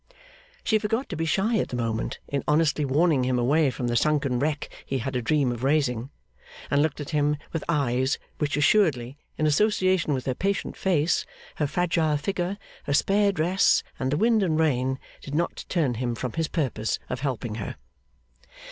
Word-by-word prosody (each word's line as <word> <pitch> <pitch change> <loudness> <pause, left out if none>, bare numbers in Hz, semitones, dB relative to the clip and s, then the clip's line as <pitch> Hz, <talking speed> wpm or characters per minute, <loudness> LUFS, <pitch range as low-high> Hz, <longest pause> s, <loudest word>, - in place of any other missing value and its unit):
She 220 - +2
forgot 225 +5 -1
to 180 - -4
be 165 +1 -1
shy 210 +7 +1
at - - 0
the - - -4
moment, 115 -2 -2
in 140 -1 -2
honestly 150 0 +2
warning 145 0 +2
him 125 0 +1
away 140 +5 +3
from 125 0 -4
the 120 - 0
sunken 140 -2 +2
wreck 145 +1 -1 0.2
he 135 - -2
had 130 +2 -3
a 125 - 0
dream 135 +1 +2
of 120 0 -5
raising; 135 -4 +1 0.6
and 140 - +4
looked 155 -1 0
at 145 - -6
him 150 -1 +1 0.2
with 165 - -2
eyes 130 -4 +1 0.2
which 145 -2 0
assuredly, 145 - +2 0.2
in 155 - +1
association 185 -1 +2
with 130 - -4
her 130 - 0
patient 195 +8 -2
face, 170 -3 +1 0.3
her 150 - +1
fragile 160 -2 +1
figure, 180 +4 -2 0.3
her 140 - -1
spare 200 +5 +3
dress, 180 +2 +3 0.2
and 130 0 -1
the 145 - +1
wind 225 +3 +3
and 160 -5 +1
rain, 130 -4 +1 0.2
did 145 - -6
not 170 +2 -1
turn 155 -8 +1
him 120 0 -2
from 125 +1 -4
his 160 -1 -1
purpose 125 -10 -1
of 125 - -4
helping 125 -5 -3
her. - - -5
150 Hz, 185 wpm, -26 LUFS, 130-170 Hz, 0.6 s, and